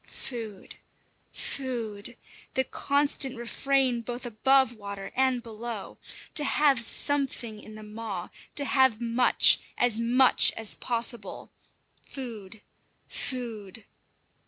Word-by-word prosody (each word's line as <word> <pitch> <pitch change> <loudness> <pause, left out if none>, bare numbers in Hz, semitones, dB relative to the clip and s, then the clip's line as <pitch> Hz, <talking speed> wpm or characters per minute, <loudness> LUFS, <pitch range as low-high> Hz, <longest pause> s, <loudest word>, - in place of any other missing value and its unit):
Food! 225 -6 -8 0.5
Food! 235 -4 -5 0.4
The 260 - +2
constant 280 -1 +1
refrain 255 +1 0
both 245 +2 -6
above 260 +2 +3
water 200 -3 -7
and 260 -2 +1
below. 225 -2 -7 0.3
To 300 - +3
have 280 -3 +3
something 245 -3 +1
in 215 0 -12
the 215 - -10
maw 210 -4 -6 0.3
to 285 - 0
have 260 -5 +3
much 235 +1 +4 0.2
as 240 -2 +3
much 245 +3 +5
as 225 -2 0
possible. 235 -4 -3 0.5
Food! 220 -6 -9 0.4
Food! 225 -5 -5
235 Hz, 105 wpm, -27 LUFS, 215-260 Hz, 0.5 s, much